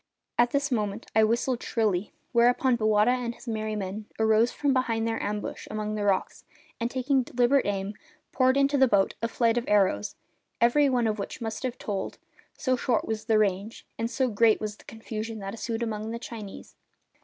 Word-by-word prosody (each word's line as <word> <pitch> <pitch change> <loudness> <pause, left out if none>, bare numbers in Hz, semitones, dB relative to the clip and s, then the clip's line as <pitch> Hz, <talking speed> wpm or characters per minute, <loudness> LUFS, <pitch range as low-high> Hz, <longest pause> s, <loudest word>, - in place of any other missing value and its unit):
At 240 0 +5
this 280 +2 0
moment 210 -2 -1
I 220 - +6
whistled 235 +3 +1
shrilly, 210 -5 0 0.2
whereupon 245 +2 +4
Bowata 215 0 +3
and 245 -2 -2
his - - -16
merry 215 -1 -2
men 205 +1 -5
arose 220 +2 +3
from 285 -2 0
behind 230 -3 0
their 225 0 -2
ambush 210 0 -4
among 215 0 -3
the 210 -1 -2
rocks 195 -2 0 0.4
and, 235 0 -1
taking 260 +1 +1
deliberate 250 +2 +2
aim, 200 0 -2 0.4
poured 260 +1 +3
into 280 0 +3
the 265 - +6
boats 200 -4 +2
a 230 - +1
flight 230 0 +2
of 240 - -7
arrows, 190 - +2 0.4
every 275 +5 +4
one 245 -3 +1
of 215 -1 0
which 200 - -5
must 225 -2 -4
have 255 -2 -3
told, 200 -5 -4 0.4
so 255 -2 +1
short 245 -2 0
was 215 -1 -3
the 220 -1 +3
range, 205 +1 -1
and 230 0 -1
so 260 +1 0
great 225 -1 +3
was 210 -1 -4
the - - -19
confusion 225 0 -6
that 195 -1 -6
ensued 230 0 -3
among 215 -1 -3
the 230 - -3
Chinese. 220 -4 -9
225 Hz, 190 wpm, -27 LUFS, 210-245 Hz, 0.4 s, I